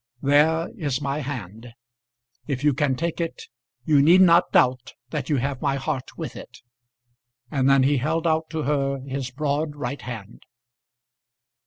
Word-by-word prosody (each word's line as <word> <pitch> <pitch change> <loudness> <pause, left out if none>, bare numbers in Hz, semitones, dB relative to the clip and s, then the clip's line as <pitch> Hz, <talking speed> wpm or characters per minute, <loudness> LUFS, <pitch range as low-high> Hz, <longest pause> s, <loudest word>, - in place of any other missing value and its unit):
There 155 +4 +3
is 145 -4 -2
my 140 0 -2
hand; 120 -5 -7 0.7
if 135 -1 -3
you 150 -1 +4
can 140 -1 0
take 170 +4 -3
it 165 - -4 0.4
you 145 -3 +4
need 170 +6 +6
not 175 -1 +5
doubt 125 -1 +2 0.2
that 145 -4 -4
you 150 - +2
have 135 0 -2
my 140 -2 +1
heart 135 -1 -4
with - - -6
it." - - -11 0.9
And 135 -2 +2
then 135 -1 +5
he 140 +1 +3
held 160 +6 -1
out 160 -1 +1
to 160 -2 -3
her 140 -1 0
his 135 -1 -4
broad, 145 +3 -2
right 140 -1 -5
hand. 115 -3 -9
140 Hz, 160 wpm, -24 LUFS, 130-155 Hz, 0.9 s, need